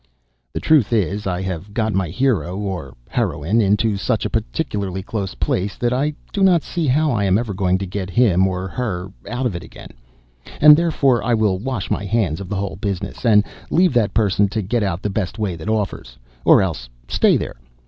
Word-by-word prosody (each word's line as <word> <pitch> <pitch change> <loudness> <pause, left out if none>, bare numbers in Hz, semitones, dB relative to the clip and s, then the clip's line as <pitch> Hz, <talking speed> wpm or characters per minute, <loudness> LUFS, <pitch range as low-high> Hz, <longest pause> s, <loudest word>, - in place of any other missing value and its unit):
] - - -48
The - - -1
truth 150 -9 +3
is, 100 -2 0
I 90 0 -2
have 95 +2 -5
got 110 -2 0
my 95 -3 0
hero 100 - 0
(or 95 -10 -5
heroine) 95 +11 0
into 105 +1 +2
such 90 - -1
a - - -2
particularly 95 +9 -2
close 100 -2 -4
place, 100 +2 -1
that 120 0 0
I 145 +4 0 0.2
do 200 - -1
not 180 -4 +4
see 170 -3 -2
how 150 +3 +2
I 105 -4 0
am 95 0 +3
ever 110 -3 -2
going 95 -1 +1
to 95 - -4
get 95 0 -4
him 95 -2 +3
(or 95 0 -3
her) 95 -4 -4 0.2
out 125 +2 -2
of 110 -8 -1
it 85 - -4
again - - -12 0.7
and 150 0 +9
therefore 145 -7 +2
I 120 -1 +2
will 105 -4 +1
wash 115 -4 -4
my - - 0
hands 100 -5 0
of 95 - -8
the 105 - -2
whole 95 -4 -3
business, 100 0 -4
and 105 -2 +6 0.3
leave 180 -1 +3
that 115 -5 +1
person 105 -2 +3
to 105 +2 -3
get 115 +5 0
out 95 -3 -2
the 105 - -1
best 95 0 -3
way 105 -5 -2
that 80 +5 -6
offers 100 - -3 0.3
or - - +6
else 75 -10 -4 0.2
stay - - +3
there. - - -5
100 Hz, 210 wpm, -20 LUFS, 95-120 Hz, 0.7 s, and